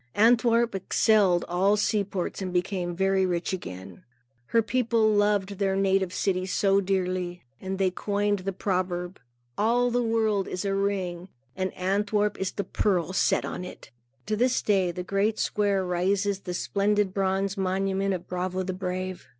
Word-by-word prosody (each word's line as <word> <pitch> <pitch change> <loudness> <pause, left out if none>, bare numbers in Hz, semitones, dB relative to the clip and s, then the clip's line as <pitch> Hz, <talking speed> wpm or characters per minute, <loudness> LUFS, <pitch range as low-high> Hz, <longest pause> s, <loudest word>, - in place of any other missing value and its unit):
Antwerp 235 +1 +4
excelled 195 -1 +2
all 190 +4 +2
seaports 200 -3 -1
and 185 -1 -3
became 180 -1 -1
very 190 +1 +2
rich 180 0 -1
again. 95 - -7 0.4
Her 230 -1 +2
people 230 -1 +1
loved 205 -2 +1
their 195 -1 +1
native 195 -1 +1
city 185 0 -1
so 195 +1 +2
dearly, 185 -2 -2 0.2
that 190 0 -4
they 190 -1 +2
coined 205 +1 -1
the 195 +1 -3
proverb 180 -1 -2 0.4
"All 240 +3 +2
the 245 +1 +1
world 220 -4 +1
is 180 +2 -4
a 195 - 0
ring, 190 -3 -2 0.3
and 185 -1 -2
Antwerp 205 +2 0
is 190 - -1
the 200 - -3
pearl 185 -4 0
set - - +2
in - - -5
it." 160 - -10 0.3
To 215 - -1
this 245 +3 +1
day, 195 -4 +2
in 170 - -6
the 180 - -4
great 200 +3 0
square, 200 -2 0
rises 190 +3 0
the 180 -2 -5
splendid 205 0 0
bronze 195 0 0
monument 195 0 0
of 175 - -8
Brabo 185 +1 -2
the 185 - -3
Brave. 185 0 -4
195 Hz, 160 wpm, -26 LUFS, 185-205 Hz, 0.4 s, Antwerp